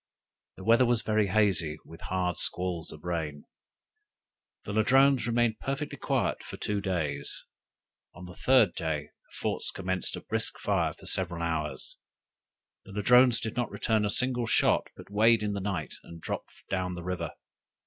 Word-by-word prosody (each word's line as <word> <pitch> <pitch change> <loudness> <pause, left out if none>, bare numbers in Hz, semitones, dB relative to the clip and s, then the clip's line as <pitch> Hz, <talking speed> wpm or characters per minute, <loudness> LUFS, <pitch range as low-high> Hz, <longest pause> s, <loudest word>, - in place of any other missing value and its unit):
The 95 - -9
weather 115 +4 +5
was 120 -2 +2
very 110 -1 +2
hazy, 90 -6 +2
with 80 - -12
hard 90 -1 -1
squalls 90 -2 -1
of - - -12
rain. 80 -4 -3 1.2
The 100 - -4
Ladrones 130 +3 +4
remained 115 -1 +2
perfectly 140 +2 -3
quiet - - 0
for - - -8
two 105 -1 -1
days. 80 -7 -2 0.7
On 90 +3 -9
the 90 - -9
third 125 -3 +4
day 75 -3 -3
the - - -17
forts - - -1
commenced 95 -1 -2
a - - -7
brisk - - -2
fire - - 0
for - - -15
several 85 -2 -1
hours: 75 -4 -3 0.9
the 100 - -13
Ladrones 125 +4 +5
did 110 - -4
not 120 0 0
return 110 -2 +1
a 105 - +1
single 125 +1 0
shot, - - +3
but - - -12
weighed 110 +2 +4
in 105 -1 -1
the 100 - -3
night 95 -8 -3
and 85 - -11
dropped - - -6
down 90 -1 -1
the 85 - -7
river. 85 -3 -3
95 Hz, 165 wpm, -29 LUFS, 85-115 Hz, 1.2 s, weather